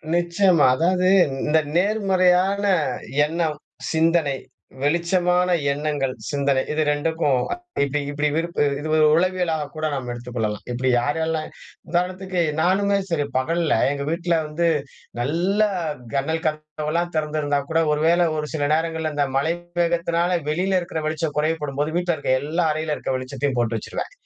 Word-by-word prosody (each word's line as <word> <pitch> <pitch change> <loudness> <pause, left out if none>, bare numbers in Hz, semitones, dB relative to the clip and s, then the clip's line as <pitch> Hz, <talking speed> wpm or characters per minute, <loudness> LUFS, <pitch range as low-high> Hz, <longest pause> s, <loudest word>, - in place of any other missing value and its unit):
நிச்சயமா. 175 -1 +3
அதாவது 180 +3 +2 0.4
இந்த 160 +1 +3 0.2
நேர்மறையான 195 -1 +2 0.6
எண்ணம், 160 -1 -2 0.3
சிந்தனை, 160 -3 +2 0.4
வெளிச்சமான 175 +4 +2 0.2
எண்ணங்கள், 145 -2 -1 0.2
சிந்தனை 140 -2 +1
இது 155 0 +1
2க்கும் 145 -3 +1 0.4
இப்படி 140 +1 -1
இப்படி 145 +1 0
வெறுப்பு 170 +1 -2 0.2
இது 150 - -5 0.3
உளவியலாக 170 -3 0
கூட 155 0 -3
நாம் 130 -3 -4
எடுத்துக்கொள்ளலாம். 120 -3 -4
இப்டி 130 +2 0
யாரெல்லாம் 160 +3 -1 0.4
உதாரணத்துக்கு, 185 +1 -1 0.2
நானுமே 200 +3 +2
சரி 155 -4 0
பகல்ல 165 +5 +1 0.2
எங்க 140 0 -3
வீட்ல 170 0 0
வந்து 165 +3 0 0.5
நல்ல 175 - +1 0.5
ஜனல் 160 +4 -1
கதவெல்லாம் 155 +2 -3
திறந்திருந்தா 150 -2 0
கூட 160 0 +2
ஒரு 150 0 0
வேள 170 +1 +4
ஒரு 150 -1 -2
சில 150 -2 -1
நேரங்கள்ல 160 0 -1
இந்த 145 -1 +2
மழை 160 +4 +1 0.3
வேகத்தினால 170 +1 +1
வெளியில 185 +5 +1
இருக்கிற 170 -2 -4
வெளிச்சம் 155 0 -2
குறையப்படும்போது 150 -1 -1
வீட்ல 175 -1 0
இருக்க 145 - -2
எல்லா 160 +4 0
அறையில 155 0 -2
இருக்க - - -4
வெளிச்சத்தையும் 130 +1 -3
போட்டு 115 -1 0
வச்சுருவன். 105 - -5
160 Hz, 130 wpm, -22 LUFS, 145-175 Hz, 0.6 s, வேள